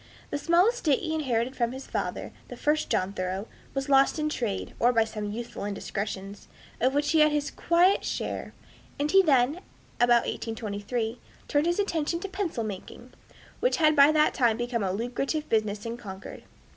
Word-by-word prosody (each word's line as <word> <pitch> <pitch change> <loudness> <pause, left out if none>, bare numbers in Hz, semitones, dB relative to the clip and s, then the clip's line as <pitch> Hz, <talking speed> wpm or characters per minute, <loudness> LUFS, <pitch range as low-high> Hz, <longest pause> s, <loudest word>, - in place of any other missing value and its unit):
The 285 - -1
small 340 +5 +4
estate 455 - +2
he 320 -3 -2
inherited 260 -4 -1
from 235 -1 0
his 265 +1 -7
father, - - -3 0.2
the - - -9
first 300 +1 0
John 185 +2 0
Thoreau, 190 +2 -3 0.3
was 270 0 -2
lost 275 +2 +4
in 305 0 0
trade, 230 -9 -3
or 240 - +4
by 230 -2 +4
some 215 -2 -5
youthful 230 -1 -6
indiscretions, 200 0 -5 0.3
of 260 +3 +2
which 290 0 +1
he 320 - +4
had 305 0 +6
his 290 -1 -1
quiet 350 +3 +3
share; - - -4 0.4
and 290 +1 0
he 385 +1 +7
then, 280 -3 +3 0.4
about 240 -1 +4
1823, 225 +1 -3 0.3
turned 295 +2 +2
his 345 - +1
attention 335 -5 0
to 395 - -3
pencil 380 - -3
making, 215 +4 -8 0.5
which - - +2
had 310 -2 +4
by 285 +1 +7
that 305 0 +3
time 235 -4 +2
become 240 -1 -2
a 190 -2 0
lucrative 245 - -2
business 215 -1 0
in 230 +1 -4
Concord. 195 -4 -9
250 Hz, 180 wpm, -27 LUFS, 220-305 Hz, 0.5 s, he